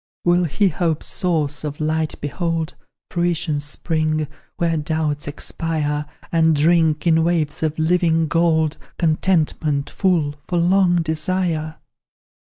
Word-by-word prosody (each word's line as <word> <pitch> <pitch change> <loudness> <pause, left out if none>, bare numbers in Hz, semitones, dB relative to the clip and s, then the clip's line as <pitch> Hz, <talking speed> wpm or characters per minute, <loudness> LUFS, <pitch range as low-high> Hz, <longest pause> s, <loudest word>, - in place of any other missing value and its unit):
"Will 175 0 +4
he 195 +6 +2
hope's 165 -1 -1
source 155 -5 0
of 150 -1 -5
light 155 0 -1
behold, 165 +2 -2 0.4
Fruition's 170 -4 0
spring, 155 +1 -1 0.3
where 170 -1 +1
doubts 155 -2 -1
expire, 150 0 -3 0.2
And 160 -1 +3
drink, 160 0 +3
in 160 -1 +4
waves 165 -3 0
of 155 -1 -1
living 165 0 +2
gold, 160 -1 +2 0.2
Contentment, 155 -3 +1
full, 170 -7 +1
for 175 - -1
long 175 0 +3
desire? 160 0 -1
160 Hz, 115 wpm, -21 LUFS, 155-170 Hz, 0.4 s, Will